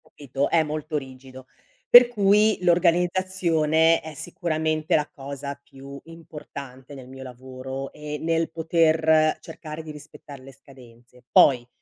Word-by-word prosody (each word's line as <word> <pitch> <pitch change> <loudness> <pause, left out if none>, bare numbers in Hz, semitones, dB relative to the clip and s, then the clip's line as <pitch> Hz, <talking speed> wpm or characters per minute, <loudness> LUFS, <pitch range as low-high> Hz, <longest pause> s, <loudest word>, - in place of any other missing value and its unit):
Capito, 140 0 -4
è 165 -1 +3
molto 155 0 -4
rigido. 130 -1 -10 0.4
Per 245 0 +9
cui 210 -1 +2
l'organizzazione 170 -2 +2
è 160 0 -9
sicuramente 155 0 -2
la 150 -2 0
cosa 140 0 -8
più 140 0 -12
importante 145 -5 -11
nel 130 -2 -12
mio 135 0 -11
lavoro 130 +1 -8
e 150 0 -7
nel 165 +1 -1
poter 160 -1 +2
cercare 160 -2 -9
di 155 - -9
rispettare 150 -2 -13
le 135 +1 -14
scadenze. 125 -2 -19
Poi 125 -3 +4
150 Hz, 125 wpm, -23 LUFS, 135-165 Hz, 0.4 s, Per